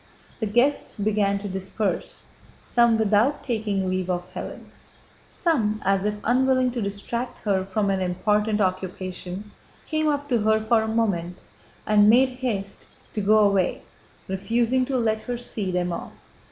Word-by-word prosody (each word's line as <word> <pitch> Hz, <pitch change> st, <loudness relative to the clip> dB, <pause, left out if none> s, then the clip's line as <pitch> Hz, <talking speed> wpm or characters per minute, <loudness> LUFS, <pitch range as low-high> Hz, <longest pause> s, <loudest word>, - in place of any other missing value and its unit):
The 220 Hz, -, -1 dB
guests 245 Hz, +7 st, +2 dB
began 205 Hz, -1 st, +1 dB
to 200 Hz, +1 st, -6 dB
disperse, 190 Hz, 0 st, -3 dB, 0.4 s
some 235 Hz, -2 st, +3 dB
without 220 Hz, +6 st, +2 dB
taking 210 Hz, -6 st, -1 dB
leave 185 Hz, 0 st, -1 dB
of 180 Hz, 0 st, -3 dB
Hélène. -, -, -7 dB, 0.6 s
Some, 225 Hz, -, 0 dB
as 195 Hz, 0 st, +2 dB
if 210 Hz, 0 st, 0 dB
unwilling 255 Hz, +1 st, +2 dB
to 240 Hz, -1 st, -3 dB
distract 205 Hz, +5 st, -3 dB
her 195 Hz, -2 st, +1 dB
from 195 Hz, +1 st, 0 dB
an 190 Hz, -1 st, 0 dB
important 210 Hz, +4 st, +1 dB
occupation, 185 Hz, +1 st, -3 dB, 0.3 s
came 310 Hz, -1 st, 0 dB
up 290 Hz, -1 st, 0 dB
to 240 Hz, -3 st, +2 dB
her 220 Hz, +1 st, +3 dB
for 220 Hz, +1 st, +2 dB
a 220 Hz, -, -2 dB
moment 195 Hz, -6 st, -1 dB, 0.5 s
and 210 Hz, 0 st, +5 dB
made 255 Hz, +4 st, +6 dB
haste 235 Hz, -6 st, -4 dB, 0.3 s
to 210 Hz, -, -2 dB
go 210 Hz, +1 st, +5 dB
away, 195 Hz, -3 st, 0 dB, 0.4 s
refusing 235 Hz, +6 st, +1 dB
to 270 Hz, -2 st, 0 dB
let 220 Hz, -2 st, 0 dB
her 245 Hz, -1 st, -4 dB
see 220 Hz, -5 st, -4 dB
them 180 Hz, -1 st, -1 dB
off. -, -, -6 dB
210 Hz, 155 wpm, -24 LUFS, 195-235 Hz, 0.6 s, made